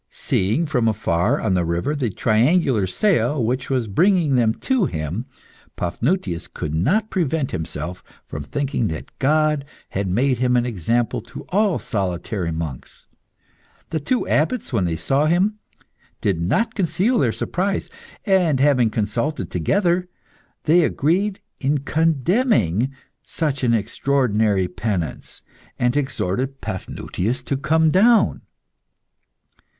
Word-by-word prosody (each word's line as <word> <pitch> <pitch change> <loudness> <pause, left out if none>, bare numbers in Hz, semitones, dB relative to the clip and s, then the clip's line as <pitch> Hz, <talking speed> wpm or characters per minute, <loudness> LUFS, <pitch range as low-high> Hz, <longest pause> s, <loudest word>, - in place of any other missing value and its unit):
Seeing 110 - 0
from 125 -7 +1
afar, 105 - +1
on 95 - 0
the 90 -1 +2
river, 85 - -1
the 130 -5 -1
triangular 115 - +2
sail 125 - +1
which 125 +3 -2
was 130 -4 0
bringing 165 - +3
them 115 -2 +2
to 260 -7 +1
him, 80 - -4 0.5
Paphnutius 90 - -1
could 75 - -5
not 190 - +1
prevent 160 -5 0
himself 85 +3 -5 0.2
from 70 - -6
thinking 135 - -1
that 80 -4 -6
God 150 +1 +2 0.3
had 100 0 -2
made 125 +6 +1
him 125 -1 +2
an 120 - +1
example 115 +2 -1
to 115 +1 -10
all 200 0 +2
solitary 95 -3 -2
monks. 80 -5 -6 0.9
The 160 - 0
two 245 - -1
abbots, 160 - 0
when 100 -6 +2
they 85 -2 -1
saw 135 - +1
him, 195 +6 +2 0.6
did 95 -5 0
not 225 - +1
conceal 200 +5 +1
their 120 - +2
surprise; 190 - -2 0.4
and, 180 -9 +3
having 130 -5 +4
consulted 115 +8 -2
together, 180 - +1 0.5
they 170 +3 +4
agreed 185 +8 0 0.2
in 140 +2 +1
condemning 145 - +1 0.3
such 145 -5 -2
an 115 -2 +3
extraordinary 110 -4 +1
penance, 90 -3 -4 0.3
and 125 +1 +1
exhorted 130 -1 -2
Paphnutius 95 +5 -4
to 140 - -2
come 160 +3 +2
down. 225 +6 +4
130 Hz, 125 wpm, -21 LUFS, 100-160 Hz, 0.9 s, having